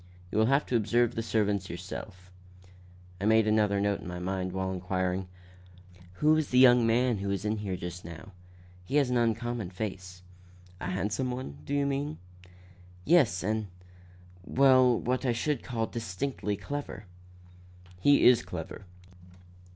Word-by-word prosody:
You 105 Hz, -, 0 dB
will 110 Hz, -, +4 dB
have 140 Hz, +3 st, +2 dB
to 125 Hz, -, -2 dB
observe 120 Hz, +1 st, +2 dB
the 115 Hz, -, -2 dB
servants 105 Hz, -4 st, 0 dB
yourself." 90 Hz, +1 st, -8 dB, 0.9 s
I 100 Hz, -, -3 dB
made 110 Hz, 0 st, +4 dB
another 105 Hz, -2 st, +2 dB
note 100 Hz, 0 st, 0 dB
in -, -, -9 dB
my 90 Hz, 0 st, -5 dB
mind 95 Hz, +1 st, -3 dB
while 95 Hz, 0 st, -2 dB
inquiring: 95 Hz, 0 st, -2 dB, 0.9 s
"Who 150 Hz, +10 st, +3 dB
is 155 Hz, -2 st, -1 dB
the 125 Hz, -, +1 dB
young 125 Hz, -2 st, +7 dB
man 120 Hz, -1 st, +2 dB
who 100 Hz, -, -4 dB
was 100 Hz, 0 st, -2 dB
here 105 Hz, -3 st, -2 dB
just 90 Hz, 0 st, -7 dB
now? 85 Hz, +4 st, -10 dB, 0.5 s
He 130 Hz, -, -4 dB
has 140 Hz, -4 st, +3 dB
an 125 Hz, -, +2 dB
uncommon 115 Hz, -3 st, -1 dB
face." 90 Hz, -2 st, -6 dB, 0.6 s
"A -, -, -5 dB
handsome 105 Hz, +7 st, -2 dB
one, 125 Hz, -, -6 dB
do 145 Hz, -, -2 dB
you 140 Hz, 0 st, +1 dB
mean?" 140 Hz, +2 st, -2 dB, 0.9 s
"Yes, 135 Hz, -, +3 dB
and 110 Hz, +1 st, -1 dB, 0.8 s
well, 130 Hz, 0 st, +4 dB
what 125 Hz, +2 st, -1 dB
I 125 Hz, -3 st, +1 dB
should 135 Hz, +3 st, -1 dB
call 115 Hz, -2 st, -2 dB
distinctly 110 Hz, 0 st, -4 dB
clever." 110 Hz, -1 st, -6 dB, 0.9 s
"He 145 Hz, +9 st, +4 dB
is 125 Hz, -1 st, +7 dB
clever. 90 Hz, +2 st, -8 dB
110 Hz, 150 wpm, -29 LUFS, 95-125 Hz, 0.9 s, young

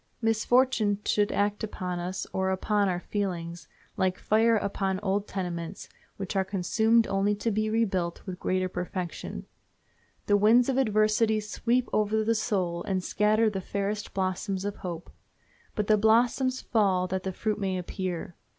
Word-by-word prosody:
Misfortune 225 Hz, -1 st, +2 dB
should 205 Hz, 0 st, +2 dB
act 205 Hz, +1 st, 0 dB
upon 180 Hz, -4 st, -4 dB
us 180 Hz, +2 st, -4 dB
or 190 Hz, 0 st, 0 dB
upon 200 Hz, +1 st, +1 dB
our 175 Hz, -1 st, -1 dB
feelings 175 Hz, -5 st, -4 dB, 0.3 s
like 185 Hz, -1 st, +1 dB
fire 225 Hz, +1 st, +3 dB
upon 195 Hz, -2 st, -1 dB
old 200 Hz, 0 st, -1 dB
tenements, 175 Hz, -1 st, -5 dB, 0.3 s
which 195 Hz, +1 st, -5 dB
are 190 Hz, -, +3 dB
consumed 220 Hz, +4 st, +2 dB
only 195 Hz, +1 st, +1 dB
to 215 Hz, +3 st, -1 dB
be 215 Hz, +1 st, 0 dB
rebuilt 190 Hz, -6 st, -1 dB
with 185 Hz, -2 st, -6 dB
greater 185 Hz, 0 st, 0 dB
perfection. 180 Hz, 0 st, -5 dB, 0.8 s
The 205 Hz, -, +4 dB
winds 230 Hz, +5 st, +5 dB
of 265 Hz, -, +1 dB
adversity 215 Hz, -1 st, +2 dB
sweep 235 Hz, +4 st, 0 dB
over 215 Hz, +1 st, +2 dB
the 225 Hz, +1 st, +2 dB
soul 190 Hz, -6 st, -1 dB
and 190 Hz, -2 st, -1 dB
scatter 215 Hz, +3 st, +2 dB
the 200 Hz, -3 st, -1 dB
fairest 200 Hz, +2 st, -3 dB
blossoms 190 Hz, +1 st, -2 dB
of 205 Hz, 0 st, -3 dB
hope. 175 Hz, -2 st, -6 dB, 0.6 s
But 210 Hz, -, 0 dB
the 215 Hz, 0 st, +3 dB
blossoms 245 Hz, +4 st, +3 dB
fall 195 Hz, -5 st, +2 dB
that 190 Hz, +1 st, -2 dB
the 190 Hz, -, -3 dB
fruit 215 Hz, +3 st, -2 dB
may 190 Hz, -2 st, -1 dB
appear. 180 Hz, -1 st, -4 dB
205 Hz, 155 wpm, -28 LUFS, 185-215 Hz, 0.8 s, winds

